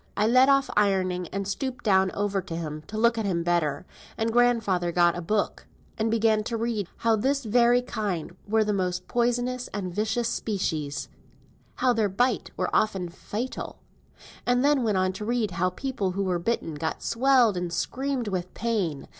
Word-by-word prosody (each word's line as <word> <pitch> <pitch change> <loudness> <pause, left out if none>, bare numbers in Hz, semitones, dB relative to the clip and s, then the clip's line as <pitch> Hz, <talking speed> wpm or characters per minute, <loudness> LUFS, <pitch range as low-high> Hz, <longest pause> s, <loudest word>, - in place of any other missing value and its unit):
I 210 - +3
left 255 +4 +5
off 275 0 +3
ironing, 185 -3 +1
and 195 +2 -4
stooped 255 +6 -3
down 190 -3 +4
over 200 -2 -1
him, 155 -2 -4
to 215 - -6
look 230 +1 +3
at 220 - -1
him 170 -3 0
better, 170 -2 0 0.3
and 225 0 0
grandfather 225 -8 +2
got 175 0 +3
a 175 - -4
book, 205 +5 -1 0.3
and 220 +1 0
began 220 -1 +2
to 230 -1 -2
read 225 -4 -2
how 230 -1 +2
this 270 +4 0
very 240 +2 +4
kind 205 -9 -3
were 220 +1 +3
the 210 0 0
most 180 -2 -2
poisonous 245 +1 0
and 185 -3 -4
vicious 220 +4 0
species, 160 -11 -2 0.7
how 255 -1 +2
their 220 -3 +1
bite 245 +5 0
were - - -1
often 190 -5 +1
fatal, 215 +8 -5 0.7
and 245 +2 +2
then 290 -2 +4
went 215 -5 +1
on 185 0 +1
to 210 - -6
read 230 -2 0
how 180 +1 +1
people 200 -2 -3
who 195 +1 -1
were 180 -2 0
bitten 170 -4 -2
got 160 +2 -4
swelled, 245 -3 +3
and 180 -1 -3
screamed 260 +6 -2
with 185 -2 -3
pain. 200 -11 -2
210 Hz, 180 wpm, -26 LUFS, 185-240 Hz, 0.7 s, left